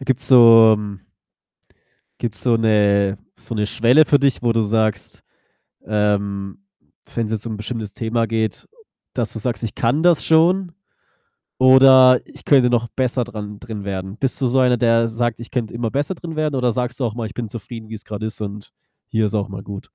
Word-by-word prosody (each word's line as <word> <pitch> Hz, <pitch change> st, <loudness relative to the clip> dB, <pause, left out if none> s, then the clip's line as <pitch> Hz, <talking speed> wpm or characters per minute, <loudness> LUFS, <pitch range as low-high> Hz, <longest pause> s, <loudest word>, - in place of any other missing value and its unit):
Gibt's 130 Hz, -1 st, -2 dB
so 115 Hz, -3 st, +7 dB
m 100 Hz, -2 st, -7 dB, 1.2 s
gibt's 115 Hz, -3 st, -5 dB
so 120 Hz, -2 st, +2 dB
'ne 100 Hz, -2 st, +2 dB, 0.2 s
so 115 Hz, -, -8 dB
'ne 105 Hz, -1 st, 0 dB
Schwelle 125 Hz, +9 st, +3 dB
für 145 Hz, -, +3 dB
dich, 140 Hz, -2 st, 0 dB
wo 120 Hz, -1 st, +1 dB
du 115 Hz, -, +1 dB
sagst 110 Hz, -1 st, -2 dB, 0.6 s
ähm, 100 Hz, -, -2 dB, 0.6 s
wenn's 115 Hz, -2 st, -2 dB
jetzt 110 Hz, +1 st, -3 dB
um 110 Hz, -, -5 dB
'n -, -, -6 dB
bestimmtes 110 Hz, -1 st, -6 dB
Thema 115 Hz, 0 st, -2 dB
geht, 110 Hz, 0 st, -3 dB, 0.5 s
dass 120 Hz, -3 st, -3 dB
du 110 Hz, -, -6 dB
sagst: 115 Hz, -1 st, -4 dB
„Ich 110 Hz, -, -4 dB
kann 140 Hz, +8 st, 0 dB
das 175 Hz, -2 st, +3 dB
schon“, 170 Hz, +2 st, +2 dB, 0.8 s
oder 130 Hz, 0 st, +6 dB
„Ich -, -, -18 dB
könnte 130 Hz, -4 st, +4 dB
noch 120 Hz, -1 st, 0 dB
besser 130 Hz, -1 st, -1 dB
dran 105 Hz, -3 st, -8 dB
drin 110 Hz, -4 st, -8 dB
werden.“ 95 Hz, +1 st, -5 dB
Bist 135 Hz, -2 st, -2 dB
du 130 Hz, -, +2 dB
so 130 Hz, +2 st, +1 dB
einer, 125 Hz, -1 st, +3 dB
der 115 Hz, 0 st, +2 dB
sagt: 120 Hz, 0 st, -2 dB
„Ich 120 Hz, -, -11 dB
könnte 120 Hz, -5 st, -3 dB
immer 115 Hz, -1 st, -3 dB
besser 145 Hz, +7 st, -2 dB
drin 165 Hz, -1 st, -8 dB
werden“, 155 Hz, -2 st, -1 dB
oder 125 Hz, -2 st, +1 dB
sagst 125 Hz, +2 st, -4 dB
du 130 Hz, -, -1 dB
auch 115 Hz, -1 st, -4 dB
mal: 115 Hz, -2 st, -4 dB
„Ich 110 Hz, -, -12 dB
bin 115 Hz, -3 st, -5 dB
zufrieden, 115 Hz, 0 st, -9 dB
wie's 110 Hz, -1 st, -9 dB
grad 110 Hz, 0 st, -7 dB
ist 110 Hz, 0 st, -6 dB
und 105 Hz, 0 st, -7 dB, 0.4 s
hier 110 Hz, -1 st, 0 dB
ist 105 Hz, +1 st, -3 dB
auch 100 Hz, -1 st, -2 dB
mal 95 Hz, 0 st, -8 dB
gut.“ 100 Hz, -1 st, -8 dB
115 Hz, 200 wpm, -19 LUFS, 105-125 Hz, 1.2 s, so